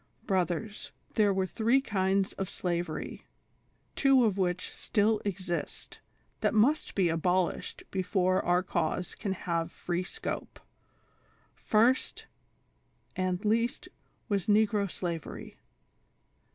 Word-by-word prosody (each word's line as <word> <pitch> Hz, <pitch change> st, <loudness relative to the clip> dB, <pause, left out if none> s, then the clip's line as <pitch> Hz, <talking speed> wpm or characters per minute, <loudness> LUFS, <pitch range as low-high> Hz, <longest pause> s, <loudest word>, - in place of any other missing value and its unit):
" -, -, -38 dB
Brothers, 190 Hz, +3 st, -1 dB, 0.2 s
there 210 Hz, -2 st, +4 dB
were 190 Hz, -1 st, +1 dB
three 230 Hz, +7 st, +2 dB
kinds 195 Hz, -5 st, 0 dB
of 195 Hz, -1 st, -4 dB
slavery, 175 Hz, -4 st, -3 dB, 0.7 s
two 270 Hz, -3 st, +5 dB
of 210 Hz, -4 st, +2 dB
which 180 Hz, -2 st, -1 dB
still 215 Hz, 0 st, +1 dB
exist, 185 Hz, -3 st, -4 dB, 0.4 s
that -, -, +1 dB
must 280 Hz, +9 st, +3 dB
be 190 Hz, -3 st, +3 dB
abolished 180 Hz, +2 st, 0 dB
before 185 Hz, -1 st, +1 dB
our 175 Hz, +1 st, +2 dB
cause 175 Hz, 0 st, -1 dB
can 200 Hz, -4 st, -3 dB
have 170 Hz, -2 st, -2 dB
free 175 Hz, +1 st, -2 dB
scope: -, -, -5 dB, 0.6 s
'' -, -, -36 dB, 0.2 s
First,— 235 Hz, +4 st, +3 dB, 0.9 s
and 185 Hz, +1 st, -1 dB
least, 230 Hz, +11 st, +1 dB, 0.4 s
was 200 Hz, -5 st, 0 dB
Xegro 210 Hz, -1 st, +3 dB
Skwery. 170 Hz, -3 st, -5 dB
190 Hz, 110 wpm, -30 LUFS, 180-215 Hz, 0.9 s, two